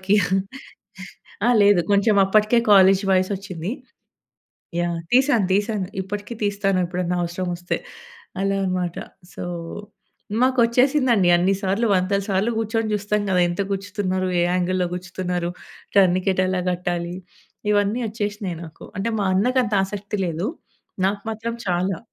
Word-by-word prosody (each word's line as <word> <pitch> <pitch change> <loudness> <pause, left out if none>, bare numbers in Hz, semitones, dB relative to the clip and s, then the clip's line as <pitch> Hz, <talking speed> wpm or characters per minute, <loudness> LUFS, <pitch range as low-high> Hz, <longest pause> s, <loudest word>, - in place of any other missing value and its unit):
ఇప్పడికి. 195 +2 +2 1.3
ఆ - - +5
లేదు 200 -3 +5
కొంచెం 200 +2 +4
అప్పటికే 215 +4 +3
కాలేజ్ 195 0 +6
వయసోచ్చింది. 185 -1 -1 1.1
యాహ్! 170 -1 -1 0.2
తీసాను. 255 -7 +4
తీసాను. 205 -2 0 0.2
ఇప్పటికే 205 +4 -6
తీస్తాను 195 -2 0
ఎప్పుడన్నా 180 0 -2
అవసరం 175 +2 -4
ఒస్తే. 175 +1 -3 0.6
అలా 195 0 +1
అన్నమాట. 180 -2 -2 0.4
సో, - - -6 1.0
మాకు 260 0 +2
ఒచ్చేసిందండి 245 -5 +3
అన్ని 180 +3 +2
సార్లు 200 +4 0
వందల 190 +2 +1
సార్లు 200 +3 +1
గూర్చొని 225 0 -1
జూస్తం 210 0 0
గదా! 180 -1 +2
ఎంత 175 +2 -3
గుర్చుతున్నారు? 195 -2 -2
ఏ - - +3
యాంగిల్లో 180 0 +1
గుర్చుతున్నారు? 180 -1 -3 0.5
టర్నికెట్ 185 0 +3
ఎలా 185 0 0
గట్టాలి? 175 -1 -2 0.6
ఇవన్నీ 205 +4 +1
ఒచ్చేసినయి 205 -5 -4
నాకు. 160 0 -12
అంటే 200 +4 -1
మా 200 - +1
అన్నకి 250 +7 +2
అంత 210 - -2
ఆసక్తి 205 +1 -5
లేదు. 170 +4 -2 0.6
నాకు 200 +1 -1
మాత్రం 230 +1 -4
చాలా. 180 0 0
195 Hz, 125 wpm, -22 LUFS, 180-210 Hz, 1.3 s, కాలేజ్